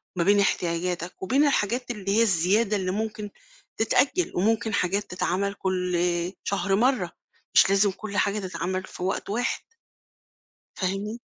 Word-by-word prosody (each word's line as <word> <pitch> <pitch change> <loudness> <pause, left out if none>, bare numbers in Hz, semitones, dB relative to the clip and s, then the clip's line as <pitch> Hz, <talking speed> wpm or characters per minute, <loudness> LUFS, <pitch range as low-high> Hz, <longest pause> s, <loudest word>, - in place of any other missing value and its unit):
ما 175 - +1
بين 205 +2 +4
احتياجاتك، 175 -1 -1
وبين 270 +10 +3
الحاجات 245 -1 0
اللي 200 -2 -1
هي - - +5
الزيادة 205 +2 +3
اللي 185 -2 -2
ممكن 210 0 -3 0.5
تتأجّل، 265 +10 +2
وممكن 220 +3 +1
حاجات 200 +2 0
تتعمل 195 +2 -1
كلّ 180 -3 -1 0.4
شهر 200 -1 0
مرّة، 225 -6 +2 0.4
مش - - +7
لازم 200 0 +4
كلّ 205 +1 -6
حاجة 205 +1 +1
تتعمل 185 -1 -3
في - - -8
وقت 190 +1 -2
واحد. 240 +4 -1 1.1
فاهمني؟ 200 +5 -3
200 Hz, 140 wpm, -26 LUFS, 185-220 Hz, 1.1 s, مش